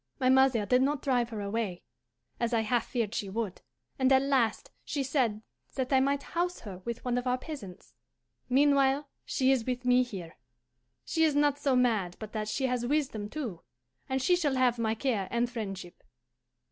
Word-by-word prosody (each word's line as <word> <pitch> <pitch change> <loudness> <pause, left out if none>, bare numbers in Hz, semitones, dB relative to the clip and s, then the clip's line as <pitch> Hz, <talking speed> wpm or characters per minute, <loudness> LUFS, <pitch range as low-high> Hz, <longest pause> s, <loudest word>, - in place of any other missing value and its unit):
"My 255 -1 +3
mother 260 -4 +4
did 250 +4 +3
not 280 +1 0
drive 245 -3 +1
her 220 -3 -5
away, 200 -3 -3 0.6
as 235 0 0
I 225 - +3
half 230 +1 0
feared 230 -4 -2
she 200 - -3
would, 205 -2 -3 0.4
and 260 0 +3
at 265 0 +5
last 260 -6 +1
she 285 -3 -2
said 250 -6 0 0.3
that 260 0 -1
I 265 - +6
might 280 +1 +1
house 355 +1 -2
her 195 -5 -8
with 235 +6 -6
one 245 0 +1
of 250 - -5
our 250 0 +2
peasants. 255 - -9 0.6
Meanwhile 280 +1 +3 0.2
she 260 0 +2
is 260 -4 +2
with 250 +1 -3
me 250 0 +5
here. 190 -9 -6 0.7
She 325 - +1
is 310 -2 +3
not 290 -1 +3
so 275 -3 +2
mad 220 -8 +2
but 215 -1 -8
that 215 -1 -3
she 265 +5 -1
has 250 -2 0
wisdom 245 -6 -1
too, 235 - -5 0.5
and 265 0 0
she 360 - +4
shall 300 -6 0
have 250 -2 +2
my 220 -1 +1
care 225 -6 -1
and 235 +1 +1
friendship. 195 -7 -6
250 Hz, 190 wpm, -30 LUFS, 220-270 Hz, 0.7 s, I